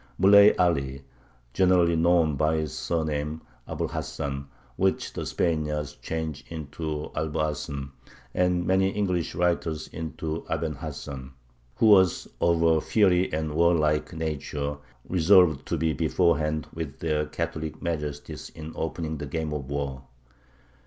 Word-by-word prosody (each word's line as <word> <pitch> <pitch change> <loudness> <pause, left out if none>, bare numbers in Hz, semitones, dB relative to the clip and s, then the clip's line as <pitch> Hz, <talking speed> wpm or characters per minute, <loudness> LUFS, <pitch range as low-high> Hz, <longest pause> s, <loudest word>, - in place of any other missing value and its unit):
Muley 100 +2 +7
Aly, 70 -6 +1 0.5
generally 90 0 +4
known 85 -2 +3
by 80 +2 +2
his 75 -3 -3
surname, 80 -1 -2 0.3
Abu - - -3
l - - -2
Hasan 70 -2 -4 0.3
(which 95 0 0
the - - -4
Spaniards 75 -3 -1
change 80 -2 -4
into 75 -1 -5
Alboacen, 75 -3 -2 0.4
and 90 -1 +1
many 95 +1 +3
English 90 -6 -1
writers 85 -2 0
into 80 0 -5
Aben 80 -2 -1
Hasan), 70 -2 -7 0.4
who - - +2
was 95 -5 +5
of 85 -1 +3
a 80 -1 +4
fiery 95 -4 +3
and 80 0 -2
warlike 75 -2 +2
nature, 75 -2 -3 0.3
resolved 90 -4 +4
to - - -1
be 80 0 +1
beforehand 80 -2 +1
with 75 -5 -5
their 75 0 -1
Catholic 80 +1 -4
majesties 75 -4 -4
in 80 0 -7
opening 80 -1 -3
the 75 - -5
game 80 +1 -3
of 70 -3 -5
war. 70 -2 -3
80 Hz, 130 wpm, -26 LUFS, 75-85 Hz, 0.5 s, Muley